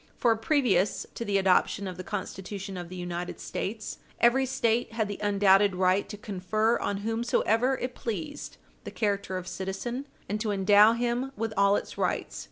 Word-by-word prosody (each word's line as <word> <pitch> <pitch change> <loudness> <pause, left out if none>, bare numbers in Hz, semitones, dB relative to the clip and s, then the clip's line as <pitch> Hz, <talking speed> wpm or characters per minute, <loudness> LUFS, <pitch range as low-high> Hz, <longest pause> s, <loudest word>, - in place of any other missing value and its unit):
For, 235 -2 +3
previous 225 - +1
to - - -4
the 205 -3 +1
adoption 195 +1 +2
of 185 - -5
the 185 - -7
Constitution 195 -1 -5
of 175 -1 -6
the 185 - -8
United 175 0 -5
States, 215 +2 -5 0.2
every 260 +3 +4
State 235 -3 0
had 220 -2 0
the 205 - -5
undoubted 200 -1 +4
right 185 +2 +2
to 210 - -6
confer 210 +3 0
on 200 - -1
whomsoever 230 +2 +1
it 250 0 -4
pleased 285 +7 -5 0.3
the - - -6
character 200 -3 -1
of 185 0 -6
citizen, 235 +10 -4 0.2
and 210 +1 -2
to 220 - -1
endow 205 +2 +6
him 240 +3 -1
with 225 -1 -2
all 200 0 +4
its - - -4
rights. - - -1
205 Hz, 175 wpm, -28 LUFS, 190-235 Hz, 0.3 s, endow